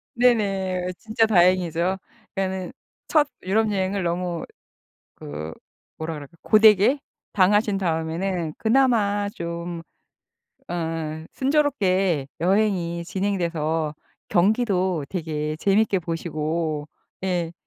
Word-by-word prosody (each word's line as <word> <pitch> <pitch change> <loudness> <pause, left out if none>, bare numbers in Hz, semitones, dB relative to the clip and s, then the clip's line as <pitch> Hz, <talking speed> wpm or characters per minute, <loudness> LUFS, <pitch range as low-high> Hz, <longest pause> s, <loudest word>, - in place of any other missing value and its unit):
네네. 195 -7 +2
진짜 225 0 +1
다행이죠. 180 -2 +3 0.4
그러니까 190 0 -2 0.4
첫 300 -2 +4 0.2
유럽 215 +3 +2
여행을 195 -1 0
너무 175 0 -2 0.7
그 75 +2 -7 0.4
뭐라 160 0 -4
그럴까 145 +3 -11
고되게 215 +5 +6 0.3
당하신 205 +1 +3
다음에는 165 -1 -1
그나마 220 -4 +2
좀 170 0 -5 0.9
어 160 -2 -3
순조롭게 195 - +2
여행이 180 -3 +1
진행돼서 170 -5 -1 0.4
경기도 185 -4 +2
되게 155 -4 -2
재밌게 200 +2 +2
보시고 160 -2 -3 0.3
예. 175 -3 -1
185 Hz, 215 characters per minute, -24 LUFS, 165-205 Hz, 0.9 s, 고되게